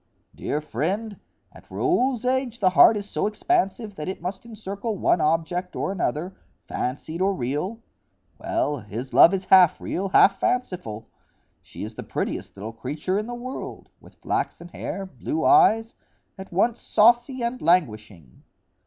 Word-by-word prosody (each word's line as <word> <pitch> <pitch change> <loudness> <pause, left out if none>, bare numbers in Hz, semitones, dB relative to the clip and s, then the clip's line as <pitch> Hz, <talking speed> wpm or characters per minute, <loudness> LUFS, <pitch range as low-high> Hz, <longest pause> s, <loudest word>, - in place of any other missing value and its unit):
"Dear 150 - -3
friend, 190 - -3 0.3
at - - -17
Raoul's 265 -10 0
age 255 -2 0
the 185 -2 +3
heart 185 +6 +7
is 205 0 -5
so 205 - -1
expansive 215 - -1
that 150 - -5
it 190 - -4
must 190 +6 -6
encircle 215 0 -5
one 175 - +2
object 165 +4 0
or - - -2
another, 180 -1 -2 0.3
fancied 155 +7 -4
or 195 +1 +2
real. 150 - -3 0.6
Well, 335 - -1
his 115 +4 -7
love 170 - +8
is 190 -1 -2
half 185 -3 +6
real, 195 +2 -3
half 195 +1 +5
fanciful. 145 - -2 0.5
She - - -10
is - - -6
the - - -7
prettiest - - -4
little 110 +3 -6
creature 150 - -3
in 215 - -5
the 240 - -5
world, 255 +2 -7
with - - -18
flaxen 170 - -3
hair, 195 +2 -5
blue 310 - -4
eyes,—at 225 - +1
once 220 +6 +1
saucy 240 +3 +3
and 240 +2 -3
languishing." 110 - 0
190 Hz, 150 wpm, -24 LUFS, 155-230 Hz, 0.6 s, love